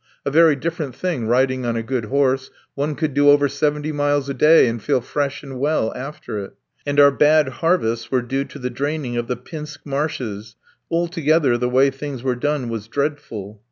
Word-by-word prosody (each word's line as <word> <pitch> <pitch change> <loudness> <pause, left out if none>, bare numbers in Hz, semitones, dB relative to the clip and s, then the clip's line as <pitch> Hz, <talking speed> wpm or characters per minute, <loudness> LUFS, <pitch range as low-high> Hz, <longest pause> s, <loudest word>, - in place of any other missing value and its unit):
A 140 - 0
very 160 0 +5
different 155 -2 -4
thing 155 -11 -2
riding 130 +2 +2
on 120 -1 -1
a 115 - -2
good 125 -1 -2
horse: 135 +1 +1 0.2
one 145 +2 -2
could 155 -3 -2
do 145 +1 +4
over 145 0 +5
seventy 145 +2 -1
miles 145 -1 0
a - - -1
day 155 +4 +6
and 115 -1 -3
feel - - +1
fresh 140 +4 -3
and 135 -3 -8
well 145 -5 0
after 135 -5 -6
it. 100 - -8 0.3
And 145 0 +1
our 140 0 +8
bad 150 +2 +4
harvests 120 -10 0
were 130 -2 +1
due 135 +3 -2
to - - -11
the 125 -2 -4
draining 140 0 -3
of 120 0 -2
the 125 - -2
Pinsk 150 +4 -9
marshes; 135 -7 -3 0.3
altogether, 165 -5 +2
the 125 +1 0
way 135 +2 +4
things 135 -2 -7
were 130 -1 +1
done 145 0 -1
was 115 -2 -5
dreadful. 115 -7 -4
140 Hz, 195 wpm, -21 LUFS, 125-150 Hz, 0.3 s, our